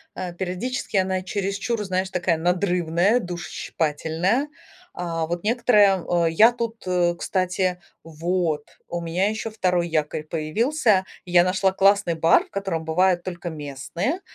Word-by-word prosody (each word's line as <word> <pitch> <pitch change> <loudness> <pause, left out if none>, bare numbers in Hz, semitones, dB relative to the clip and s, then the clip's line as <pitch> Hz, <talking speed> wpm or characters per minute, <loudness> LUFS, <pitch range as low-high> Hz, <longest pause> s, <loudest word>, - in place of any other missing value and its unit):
Э, 180 -2 -5
периодически 190 +5 -3
она 185 0 +1
чересчур, 200 +4 -2
знаешь, 185 0 -1
такая 175 -3 0
надрывная, 180 +4 +1
душещипательная. 175 - -2 0.5
А, 165 -2 -2
вот 175 +2 -3
некоторые, 210 -5 +4 0.2
э, 165 - 0
я 220 +8 +6
тут, 235 -1 -4
э, 175 -1 +2
кстати 185 0 -1 0.2
Вот, 165 -1 -2 0.2
у 175 - -4
меня 175 +4 0
еще 220 +1 -4
2 180 -5 0
якорь 155 -1 -1
появился. 190 - +1 0.2
Я 175 -1 +5
нашла 185 +1 +2
классный 195 -2 +3
бар, 165 +1 +4
в - - -26
котором 190 -5 -3
бывают 180 +2 +2
только 175 -1 -6
местные. 160 - -4
180 Hz, 135 wpm, -23 LUFS, 170-200 Hz, 0.5 s, я